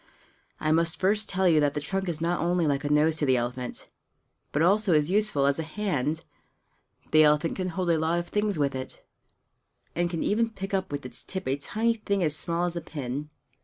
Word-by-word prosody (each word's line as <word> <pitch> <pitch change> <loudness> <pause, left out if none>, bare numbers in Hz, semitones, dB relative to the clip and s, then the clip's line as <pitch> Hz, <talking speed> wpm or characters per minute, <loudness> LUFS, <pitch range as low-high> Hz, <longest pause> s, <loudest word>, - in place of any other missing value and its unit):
I 155 - 0
must 165 +1 +2
first 205 +3 +2
tell 190 0 +2
you 160 -3 +5
that 145 -1 +1
the - - 0
trunk 190 +5 -2
is 160 -2 -3
not 170 +2 0
only 175 0 +1
like 140 -1 0
a 145 - -1
nose 155 +2 +3
to 150 - +1
the 130 -1 +4
elephant, 125 +1 -4 0.6
but 150 - +1
also 195 0 +3
is 150 +3 +2
useful 205 -9 +2
as 140 +2 +2
a - - -1
hand; 160 -4 -2 0.9
the 155 - +6
elephant 150 +1 +3
can 185 -1 -2
hold 180 0 -1
a 165 - +2
lot 160 +2 +1
of 175 0 -3
things 210 -2 0
with 140 -2 +1
it, 130 0 -7 0.9
and 175 0 +1
can 170 -2 -2
even 230 +2 +1
pick 195 -2 -7
up 190 -3 -1
with 145 -2 -4
its 125 - -6
tip 190 -4 -5
a 135 - +1
tiny 220 +11 0
thing 200 -4 -1
as 155 -2 +1
small 170 +2 -1
as 175 -1 -2
a 170 - -3
pin. 145 -1 -5
165 Hz, 220 wpm, -27 LUFS, 150-190 Hz, 0.9 s, the